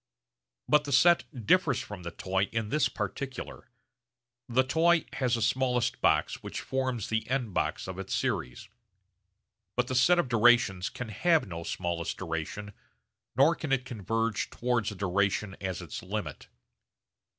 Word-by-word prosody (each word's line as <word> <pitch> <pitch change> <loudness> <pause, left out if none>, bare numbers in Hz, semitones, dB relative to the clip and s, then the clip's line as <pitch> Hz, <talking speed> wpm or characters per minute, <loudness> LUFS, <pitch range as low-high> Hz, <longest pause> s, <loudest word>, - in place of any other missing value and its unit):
But 150 0 +4
the 145 - -4
set 170 +6 +5 0.2
differs 170 - +3
from 105 -3 -7
the 85 - -5
toy 95 +3 -1
in 115 -2 -2
this 140 0 +2
particular: 135 0 -5 0.8
the 130 +2 +3
toy 165 +5 +3
has 125 -3 +1
a 115 - -1
smallest 125 0 +1
box - - +2
which - - -5
forms 130 -5 -2
the 110 0 -1
end 125 -6 -1
box - - -1
of 95 0 -6
its 95 - -3
series; 60 - -2 1.1
but 125 - +2
the 130 - -4
set 130 +8 +5
of 175 - +2
durations 115 -5 +4
can 125 -2 -7
have 165 - +2
no 85 -2 -6
smallest 85 0 -3
duration 95 +4 -5 0.6
nor 140 +6 +5
can 155 -4 -5
it 130 -2 +1
converge 115 -1 -2
towards 120 -3 -1
a - - -8
duration 100 +1 0
as 95 -2 -3
its - - -7
limit. - - -5
120 Hz, 150 wpm, -29 LUFS, 100-130 Hz, 1.1 s, set